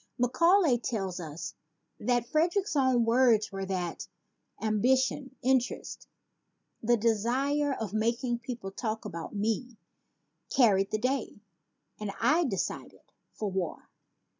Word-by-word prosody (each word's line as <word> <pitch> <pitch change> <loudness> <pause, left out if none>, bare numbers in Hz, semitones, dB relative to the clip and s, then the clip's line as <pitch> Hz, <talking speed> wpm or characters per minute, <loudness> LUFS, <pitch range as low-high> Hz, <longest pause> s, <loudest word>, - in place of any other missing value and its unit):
Macaulay 285 +3 +4
tells 195 -7 -3
us 160 -1 -6 0.5
that 245 -1 +1
Frederick's 345 - +1
own 260 -4 +3
words 230 -2 +4
were 195 -1 -4
that 180 -3 -3 0.5
"ambition, 260 +5 +1
interest, 255 -1 0 0.7
the 240 +2 +3
desire 250 +7 +1
of 220 -6 -4
making 235 +2 0
people 240 -5 -6
talk 220 +1 -4
about 170 -2 -6
me 225 +3 -2 0.7
carried 195 -6 +4
the 215 - 0
day; 255 -1 -2 0.6
and 210 -2 -3
I 330 +3 +3
decided 195 -9 -4 0.3
for 210 -2 -3
war." 185 -3 -4
235 Hz, 115 wpm, -29 LUFS, 210-260 Hz, 0.7 s, Macaulay